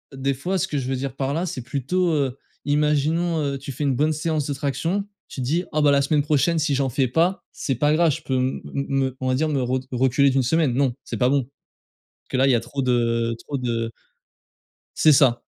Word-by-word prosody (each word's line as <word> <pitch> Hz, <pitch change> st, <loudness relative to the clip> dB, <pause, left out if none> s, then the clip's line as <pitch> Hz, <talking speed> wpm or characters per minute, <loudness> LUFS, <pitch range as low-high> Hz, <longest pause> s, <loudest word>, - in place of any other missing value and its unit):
des 135 Hz, +1 st, 0 dB
fois, 180 Hz, +9 st, -2 dB
ce -, -, 0 dB
que 150 Hz, -, -3 dB
je 130 Hz, -2 st, -2 dB
veux 135 Hz, -, 0 dB
dire 135 Hz, 0 st, -4 dB
par 135 Hz, 0 st, -2 dB
là, 165 Hz, +4 st, -1 dB
c'est 145 Hz, -7 st, -4 dB
plutôt, 145 Hz, +8 st, -1 dB
heu, 135 Hz, -4 st, 0 dB, 0.3 s
imaginons, 150 Hz, +3 st, +1 dB
heu, 140 Hz, -1 st, -1 dB
tu 135 Hz, +1 st, -7 dB
fais 135 Hz, -, -5 dB
une 140 Hz, -2 st, +1 dB
bonne 150 Hz, +5 st, +2 dB
séance 155 Hz, -1 st, -1 dB
de 145 Hz, -, -1 dB
traction. 165 Hz, +8 st, -2 dB, 0.2 s
Tu 135 Hz, -, -7 dB
te -, -, -2 dB
dis: 165 Hz, +7 st, 0 dB
«Ah, 155 Hz, -, +1 dB
bah, 145 Hz, -1 st, +5 dB
la 140 Hz, 0 st, +4 dB
semaine 145 Hz, +1 st, +2 dB
prochaine, 155 Hz, +3 st, +2 dB
si 155 Hz, -2 st, +1 dB
j'en 135 Hz, 0 st, +1 dB
fais 130 Hz, +1 st, +1 dB
pas, 170 Hz, +9 st, +1 dB
c'est 135 Hz, -, -2 dB
pas 145 Hz, +5 st, +2 dB
grave. 165 Hz, +1 st, +4 dB
Je -, -, -5 dB
peux 130 Hz, -, -2 dB
me 130 Hz, +1 st, -1 dB
m 140 Hz, 0 st, -2 dB
me 135 Hz, -1 st, 0 dB
on 130 Hz, -, -3 dB
va 130 Hz, -, +2 dB
dire, 155 Hz, +4 st, +1 dB
me 140 Hz, -3 st, 0 dB
re 130 Hz, +1 st, 0 dB
reculer 130 Hz, +2 st, +3 dB
d'1 135 Hz, 0 st, +2 dB
semaine», 150 Hz, 0 st, +2 dB
non, 130 Hz, -1 st, +1 dB
c'est -, -, -5 dB
pas 125 Hz, -1 st, +3 dB
bon 140 Hz, 0 st, +2 dB
parce 140 Hz, +4 st, -24 dB, 0.6 s
que, -, -, 0 dB
là, 135 Hz, +1 st, +4 dB
il -, -, +4 dB
y -, -, +4 dB
a -, -, +2 dB
trop 120 Hz, +4 st, -5 dB
de 115 Hz, -2 st, +1 dB
trop 140 Hz, -, -5 dB
de 115 Hz, -2 st, -2 dB, 1.1 s
C'est 155 Hz, -, +5 dB
ça. 130 Hz, -4 st, +4 dB
140 Hz, 250 wpm, -23 LUFS, 130-150 Hz, 1.1 s, bah